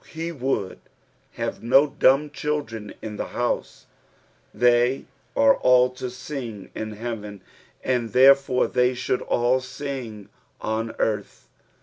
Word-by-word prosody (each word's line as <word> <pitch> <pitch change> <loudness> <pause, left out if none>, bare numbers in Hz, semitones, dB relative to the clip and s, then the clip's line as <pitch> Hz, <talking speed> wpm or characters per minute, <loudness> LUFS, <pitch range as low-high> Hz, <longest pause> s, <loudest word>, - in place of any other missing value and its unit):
He 165 +1 -4
would 130 - -2 0.5
have - - -4
no 130 +5 +5
dumb 145 0 +3
children 140 -9 -3
in 105 -1 -6
the - - -3
house. 120 0 -2 0.7
They 120 +3 +2 0.3
are 280 -1 +6
all 125 0 +4
to 125 0 -6
sing 125 -5 -7
in 110 0 -5
heaven, 105 -3 -6 0.4
and 125 -3 0
therefore 135 0 +5
they 125 0 +1
should 125 0 -1
all 120 +2 +1
sing 130 -5 -7 0.3
on 110 +1 -3
earth. 110 -1 -2
125 Hz, 120 wpm, -24 LUFS, 115-135 Hz, 0.7 s, are